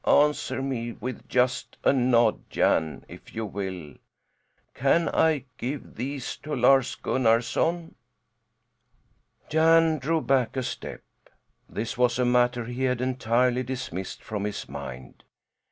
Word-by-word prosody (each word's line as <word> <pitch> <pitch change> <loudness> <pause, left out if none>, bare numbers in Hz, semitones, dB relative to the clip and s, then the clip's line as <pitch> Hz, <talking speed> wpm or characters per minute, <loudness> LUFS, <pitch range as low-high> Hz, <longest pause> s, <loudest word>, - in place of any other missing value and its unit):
"Answer 145 -3 +2
me 120 -3 -3
with 125 +3 -7
just 125 0 0
a - - +5
nod, 120 -4 +2
Jan, 80 -1 +1
if - - -13
you 110 0 -2
will. 95 -7 -5 0.8
Can 165 +6 +2
I 155 -5 +2
give 135 +3 -5
these 135 +2 -4
to 150 -1 -5
Lars 130 +1 +4
Gunnarson?" 130 +8 +1 1.6
Jan 160 0 +4
drew 160 +5 +1
back 130 -4 +1
a 130 - 0
step. - - -6 0.7
This 115 +3 -4
was 125 -1 +3
a 125 - +2
matter 120 -1 +2
he 125 +2 -2
had 125 -1 0
entirely 125 0 +1
dismissed 125 -8 -5
from 105 -2 -4
his 105 -1 -4
mind. 65 -2 -9
125 Hz, 125 wpm, -26 LUFS, 115-135 Hz, 1.6 s, a